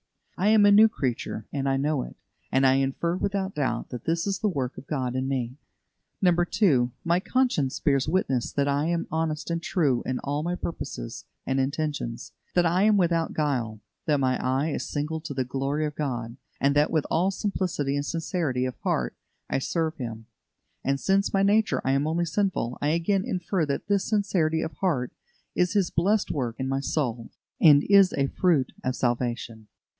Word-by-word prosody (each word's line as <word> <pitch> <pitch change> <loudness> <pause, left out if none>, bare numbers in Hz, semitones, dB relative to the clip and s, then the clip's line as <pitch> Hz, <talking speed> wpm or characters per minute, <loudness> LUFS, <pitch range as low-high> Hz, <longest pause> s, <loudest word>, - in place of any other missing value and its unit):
I 190 - 0
am 215 -1 +6
a 205 - +7
new 215 +2 +7
creature, 130 - -3
and 135 -1 -1
I 135 - +2
know 145 0 0
it, - - -8 0.4
and 135 +1 +3
I 130 - +6
infer 135 +6 0
without 195 0 -2
doubt 130 -5 -2
that 125 -2 -7
this 165 0 0
is 200 -1 -1
the 215 - +1
work 135 -7 -3
of 135 - -15
God 130 -4 -2
in 130 0 -1
me. 130 -1 -2 0.7
2. 175 - +3
My 170 +1 +2
conscience 200 - 0
bears 140 -2 +2
witness 150 -8 0
that 140 0 0
I 145 +2 +1
am 170 0 0
honest 160 0 -2
and 170 0 -1
true 145 -9 +1
in 130 - -2
all 145 +1 -1
my 175 +3 -2
purposes 160 - -6 0.2
and 135 0 0
intentions; 140 -4 -2 0.2
that 175 -1 +4
I 175 +3 +2
am 210 0 +5
without 170 -3 +1
guile; 120 -8 -1 0.3
that 150 -2 +3
my 130 -1 0
eye 130 +4 +1
is - - -3
single 155 +2 -2
to 155 -3 -6
the 130 -1 0
glory 135 +4 -1
of 150 - -3
God, 120 -5 -4 0.2
and 140 +1 +2
that 145 +1 +4
with 155 -3 0
all 180 +4 +2
simplicity 185 -8 -1
and 145 - -1
sincerity 160 -6 -1
of 130 - -3
heart 60 -1 -1 0.3
I - - 0
serve 160 +3 -1
Him; 115 -3 -6 0.6
and, 140 +1 0
since 195 +4 +2
by 195 0 +1
nature 210 +2 +3
I 135 - +2
am 140 +2 +1
only 170 +2 0
sinful, 170 - -1
I 145 - +1
again 170 +5 +1
infer 180 -6 -1
that 140 +7 -3
this 200 -1 +1
sincerity 180 -7 +1
of 160 - -4
heart 145 -10 0 0.4
is 180 0 +1
His 200 -4 +1
blessed 200 +5 +1
work 125 -6 -2
in 130 - -1
my 135 0 0
soul, 125 -5 -2 0.3
and 145 -2 +7
is 200 -2 +6
a 140 - +1
fruit 155 -2 +1
of 130 0 -1
salvation. 120 -3 -2
150 Hz, 190 wpm, -26 LUFS, 130-180 Hz, 0.7 s, a